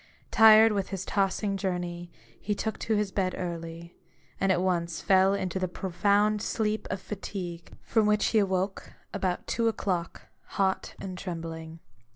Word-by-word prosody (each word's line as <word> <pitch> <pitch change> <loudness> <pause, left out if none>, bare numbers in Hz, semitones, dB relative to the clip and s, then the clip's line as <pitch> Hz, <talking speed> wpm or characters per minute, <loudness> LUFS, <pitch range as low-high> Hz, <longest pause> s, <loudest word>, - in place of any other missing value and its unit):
Tired 220 0 +8
with 200 -2 -1
his 195 -1 -4
tossing 195 0 0
journey, 175 -2 -3 0.3
he 210 0 -2
took 220 +2 -3
to 220 - 0
his 210 -2 0
bed 185 -2 -1
early; 170 -1 -6 0.4
and 195 - +2
at 180 - +2
once 170 -3 0
fell 190 +2 +4
into 190 -1 -2
the 185 - 0
profound 200 +4 +1
sleep 215 0 -1
of 190 - -2
fatigue, 180 -4 -6
from 220 -2 +2
which 210 0 +3
he 220 - +3
awoke, 190 -1 -1 0.2
about 185 -3 -2
two 230 -1 0
o'clock, 185 -6 -2 0.3
hot 190 -1 0
and 185 -2 -6
trembling. 165 -3 -6
190 Hz, 155 wpm, -28 LUFS, 175-205 Hz, 0.4 s, Tired